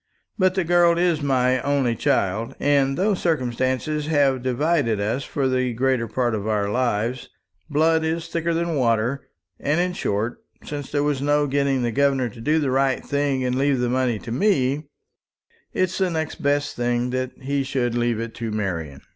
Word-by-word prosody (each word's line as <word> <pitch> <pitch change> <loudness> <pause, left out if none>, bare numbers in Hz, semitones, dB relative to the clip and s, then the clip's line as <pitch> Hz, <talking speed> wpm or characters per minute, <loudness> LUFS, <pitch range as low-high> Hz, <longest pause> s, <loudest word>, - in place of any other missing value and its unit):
But 185 -2 +2
the 190 - +1
girl 170 0 +4
is 170 -3 +2
my 130 -2 +2
only 135 -4 +1
child, 105 +2 0
and 140 -1 +2
though 200 +3 +2
circumstances 145 -2 -1
have 140 -4 +2
divided 130 -2 +1
us 110 +7 -1
for 135 -1 -1
the 130 -1 0
greater 125 0 +1
part 120 0 0
of 105 -1 -3
our 105 -2 0
lives, 120 +1 -1 0.4
blood 160 +2 +2
is 165 +1 -2
thicker 165 0 -1
than 170 0 -1
water; 125 0 0 0.3
and 150 +4 0
in 180 0 0
short, 110 - -2 0.2
since 145 -2 -6
there 145 -1 +1
was 145 -2 0
no 145 +1 +2
getting 140 -2 +1
the 120 - 0
governor 135 -1 +2
to 115 - -12
do 150 +6 +2
the 145 -4 0
right 135 0 +1
thing, 140 -2 0
and 125 0 0
leave 140 0 +2
this 120 0 0
money 125 -3 +1
to 115 +2 -8
me, 140 - +1 0.8
it's 185 +1 -1
the 190 -1 +2
next 160 -2 -3
best 145 0 0
thing 120 0 0
that 130 0 -2
he 140 +1 -1
should 130 -3 -1
leave 120 -1 0
it 115 0 -5
to 115 -1 -4
Marian." 85 -10 -3
135 Hz, 180 wpm, -23 LUFS, 120-150 Hz, 0.8 s, girl